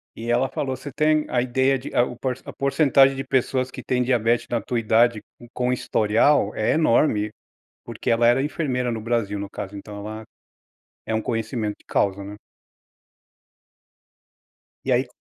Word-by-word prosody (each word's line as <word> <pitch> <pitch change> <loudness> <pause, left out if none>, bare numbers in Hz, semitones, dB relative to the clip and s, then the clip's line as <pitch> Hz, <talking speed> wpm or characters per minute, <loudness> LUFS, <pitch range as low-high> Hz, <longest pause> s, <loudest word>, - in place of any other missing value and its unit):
E 115 +1 -6
ela 125 +2 +2
falou: 135 -1 -3
"Você 140 +3 -9
tem 155 +2 +2
a 125 - +1
ideia 130 +2 +1
de 125 - -9
a 120 - +5
o 125 - -5
por 125 0 -2
a - - -7
porcentagem 135 -1 +3
de 135 - -4
pessoas 130 -1 0
que - - -8
têm 125 -1 0
diabetes 120 -2 +1
na 120 - 0
tua 120 - -3
idade, 115 0 +3 0.3
com 125 0 0
historial, 110 0 +2
é 110 - +1
enorme". 115 -8 +2 0.6
Porque - - -4
ela 115 0 +3
era 120 +3 +4
enfermeira 135 -4 -1
no 115 -1 -3
Brasil, 110 -3 -1
no 100 0 -6
caso, 100 0 -7
então 105 +1 -9
ela 110 +2 -7 0.8
é 110 - -2
um 110 - 0
conhecimento 115 -2 -2
de - - -26
causa, 100 0 0
né. 100 +1 -8 2.5
E - - 0
aí - - +2
120 Hz, 170 wpm, -23 LUFS, 110-130 Hz, 2.5 s, a